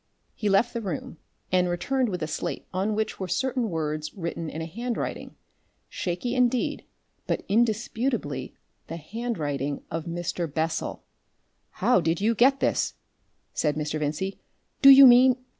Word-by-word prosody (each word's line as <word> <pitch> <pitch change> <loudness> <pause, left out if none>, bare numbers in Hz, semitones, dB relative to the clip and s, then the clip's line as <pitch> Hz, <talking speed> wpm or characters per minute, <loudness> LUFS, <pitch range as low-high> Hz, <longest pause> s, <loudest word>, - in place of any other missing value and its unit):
He 210 - -2
left 200 +5 +3
the 235 - -3
room, 180 -5 -5 0.3
and 180 -1 +3
returned 245 +9 0
with 180 -4 -3
a - - -2
slate - - -4
on 195 +3 0
which 215 0 -2
were 190 - -3
certain 250 +4 -1
words 155 -2 -3
written 170 -3 -4
in 160 - -6
a 160 - -3
handwriting, 235 +8 -4 0.5
shaky 185 +7 -3
indeed, 250 -1 +1 0.4
but - - -1
indisputably 220 - -1 0.3
the 165 - -6
handwriting 150 - -3
of 165 0 -3
Mr. 170 -1 -3
Bessel! 160 +1 -2 0.8
"How - - +5
did 165 +1 0
you 220 +3 +2
get 265 +4 +4
this?" - - 0 0.6
said 150 -2 0
Mr. 150 0 -2
Vincey. 155 +6 -3 0.4
"Do 275 - +9
you 275 0 +11
mean 255 +1 +7
185 Hz, 145 wpm, -26 LUFS, 160-235 Hz, 0.8 s, you